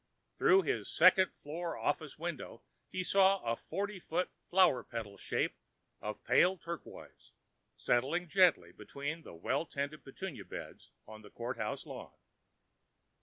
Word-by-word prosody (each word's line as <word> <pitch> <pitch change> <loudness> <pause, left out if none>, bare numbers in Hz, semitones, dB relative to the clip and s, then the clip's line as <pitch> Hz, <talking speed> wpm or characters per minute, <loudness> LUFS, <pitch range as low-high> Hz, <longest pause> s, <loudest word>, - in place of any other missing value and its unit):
Through 385 0 +6
his - - -1
second 190 -4 +6
floor 165 +3 -4
office - - -2
window, - - -5 0.3
he 185 - -2
saw 195 +1 +5
a 115 0 0
forty 200 - -4
foot 175 +1 -2 0.2
flower 180 -9 +5
petal 110 -4 -6
shape - - -1 0.5
of 105 0 -5
pale 185 +2 +4
turquoise 170 0 -9 0.4
settling 145 +9 +1
gently 180 0 +4
between 145 +4 -5
the 120 - -11
well 135 - -1
tended 145 +2 -4
petunia 155 +3 -7
beds - - -9 0.2
on 110 0 -11
the 105 - -13
courthouse 120 +4 -4
lawn. - - -9
160 Hz, 130 wpm, -34 LUFS, 125-185 Hz, 0.5 s, Through